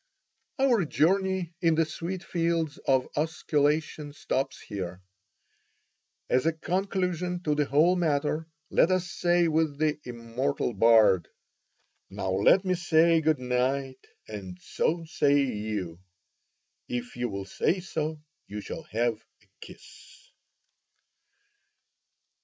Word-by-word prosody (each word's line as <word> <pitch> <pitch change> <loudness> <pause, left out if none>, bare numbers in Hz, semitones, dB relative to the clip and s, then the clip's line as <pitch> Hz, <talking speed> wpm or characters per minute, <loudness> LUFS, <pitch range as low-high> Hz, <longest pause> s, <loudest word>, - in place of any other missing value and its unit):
Our 255 -7 +3
journey 190 +2 +1
in 165 -2 +3
the 165 0 +3
sweet 175 +4 -5
fields 165 -4 -1
of 130 -1 +3
osculation 150 -1 0
stops 135 -2 -2
here. 90 -3 -6 1.3
As 130 +5 +2
a 165 - +2
conclusion 180 0 -2
to 150 - +1
the 150 0 +1
whole 155 +7 +4
matter, 155 -2 0 0.2
let - - +4
us 185 -1 0
say 175 0 +2
with 160 -2 +1
the 155 0 0
immortal 120 +2 -2
bard: 105 -5 +5 0.8
Now 95 - -3
let 100 - +4
me 185 - +2
say 165 -1 +3
good 155 -1 +2
night, 130 +1 -1 0.3
and 95 -4 -7
so 165 - -1
say 145 -3 +2
you; 105 -8 -4 0.9
If 120 -1 -4
you 120 0 -2
will 100 -1 -5
say 175 - 0
so, 155 -4 -4 0.2
you 105 +1 -6
shall 165 - -6
have 115 -1 0 0.2
a - - -29
kiss. - - -15
150 Hz, 120 wpm, -27 LUFS, 125-170 Hz, 1.3 s, bard